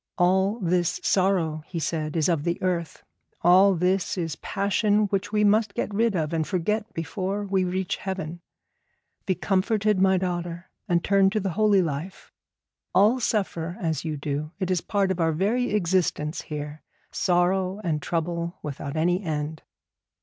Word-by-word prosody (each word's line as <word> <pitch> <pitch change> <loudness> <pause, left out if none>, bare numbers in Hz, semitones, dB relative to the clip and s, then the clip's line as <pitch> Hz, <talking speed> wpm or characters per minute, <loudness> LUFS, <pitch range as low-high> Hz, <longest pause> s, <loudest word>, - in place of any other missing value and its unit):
All 190 +5 +2
this 175 -1 +1
sorrow,' 180 -5 +1
he 175 - -6
said, 155 -1 -2
'is 155 - +2
of 165 -5 +1
the 170 +1 -1
earth. 175 -3 -2 0.4
All 185 +3 +6
this 180 +3 0
is 165 -3 -2
passion 205 +1 +1
which 195 +1 -1
we 210 -1 +2
must 210 0 +3
get 210 - -2
rid 225 0 +2
of, 160 -2 -1
and 160 -1 0
forget 210 +4 -1
before 190 +4 -3
we 190 -1 +1
reach 185 0 -2
heaven. 175 -3 -5 0.9
Be 185 - +2
comforted, 200 +3 +1
my 190 0 +4
daughter, 175 -1 -4 0.2
and 175 -3 +1
turn 195 -1 +4
to 215 +2 -1
the 195 -2 -2
holy 205 0 +3
life. 160 +4 -5 0.6
All 215 +7 +5
suffer 185 -7 -1
as 160 -5 -1
you 155 -2 -3
do. 145 +1 -3
It 185 -2 -2
is 180 -2 +1
part 200 -2 0
of 185 - -2
our 165 -1 +2
very 220 +9 +1
existence 175 -5 0
here, 150 0 -6 0.3
sorrow 185 +2 +1
and 155 -4 -1
trouble 170 +2 -2
without 145 0 -5
any 175 +4 +2
end.' 155 -3 -3
180 Hz, 160 wpm, -25 LUFS, 165-195 Hz, 0.9 s, All